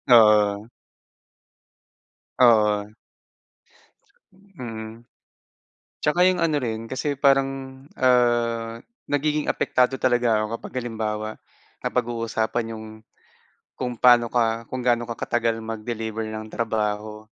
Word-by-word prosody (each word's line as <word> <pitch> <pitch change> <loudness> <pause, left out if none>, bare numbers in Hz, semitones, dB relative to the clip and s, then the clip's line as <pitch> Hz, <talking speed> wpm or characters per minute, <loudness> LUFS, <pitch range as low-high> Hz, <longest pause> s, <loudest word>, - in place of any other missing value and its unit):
Oo. 105 -2 +5 1.7
Oo. 105 -4 +4 1.6
Mhm. 110 -2 -7 1.0
'Tsaka 175 +4 +3
yung 185 -1 +2
ano 160 -2 +2
rin 115 -3 -4
kasi 135 +4 -2
parang, 135 -1 +1 0.2
ah, 120 -2 +2 0.3
nagiging 150 +1 0
apektado 125 +1 +1
talaga 120 -3 +2
ako 110 +2 -2
kapag - - -10
halimbawa 110 -3 -3 0.6
napaag-uusapan 115 -1 -1
yung, 110 0 -8 0.9
kung 125 -1 -3
paano 120 0 +6
ka 115 -1 0
kung 130 - -2
gaano 120 -1 +2
ka 120 - -3
katagal 115 -1 -1
mag-deliver 110 0 -4
ng 110 0 -6
trabaho. 105 -1 -2
115 Hz, 95 wpm, -24 LUFS, 110-125 Hz, 1.7 s, paano